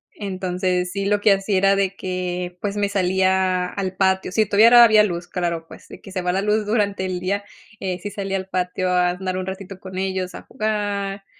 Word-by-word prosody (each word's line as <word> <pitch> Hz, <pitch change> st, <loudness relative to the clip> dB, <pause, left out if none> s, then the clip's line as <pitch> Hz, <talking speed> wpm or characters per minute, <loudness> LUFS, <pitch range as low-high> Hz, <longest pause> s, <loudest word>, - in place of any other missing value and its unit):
Entonces, 185 Hz, -2 st, -2 dB
sí, 200 Hz, 0 st, -2 dB
lo 205 Hz, 0 st, +2 dB
que 205 Hz, -1 st, +5 dB
hacía 195 Hz, 0 st, 0 dB
era 195 Hz, +1 st, +4 dB
de 195 Hz, 0 st, -1 dB
que, 180 Hz, -1 st, -4 dB
pues, 205 Hz, 0 st, -3 dB
me 205 Hz, -1 st, +1 dB
salía 185 Hz, -1 st, +1 dB
al 190 Hz, -1 st, -4 dB
patio 190 Hz, -1 st, +1 dB
si 215 Hz, +3 st, +2 dB
todavía 230 Hz, +4 st, +7 dB
había 215 Hz, -1 st, +6 dB
luz, 175 Hz, -3 st, -3 dB
claro, 170 Hz, -2 st, -3 dB
pues, -, -, -14 dB
de -, -, -11 dB
que 195 Hz, -, -12 dB
se 185 Hz, -, -2 dB
va 180 Hz, 0 st, 0 dB
la 190 Hz, +2 st, 0 dB
luz 210 Hz, +1 st, +1 dB
durante 205 Hz, -3 st, 0 dB
el 180 Hz, -1 st, -3 dB
día, 200 Hz, +3 st, -2 dB, 0.4 s
eh, 185 Hz, -1 st, -3 dB
sí 205 Hz, -, -5 dB
salía 195 Hz, -1 st, -3 dB
al 190 Hz, 0 st, -6 dB
patio 185 Hz, 0 st, -1 dB
a 180 Hz, -1 st, +3 dB
andar 185 Hz, +1 st, -3 dB
un 185 Hz, -, -3 dB
ratito 190 Hz, 0 st, -7 dB
con 185 Hz, -1 st, -8 dB
ellos 190 Hz, -1 st, -2 dB
a -, -, -9 dB
jugar, 205 Hz, -3 st, -3 dB
190 Hz, 215 wpm, -22 LUFS, 185-200 Hz, 0.4 s, todavía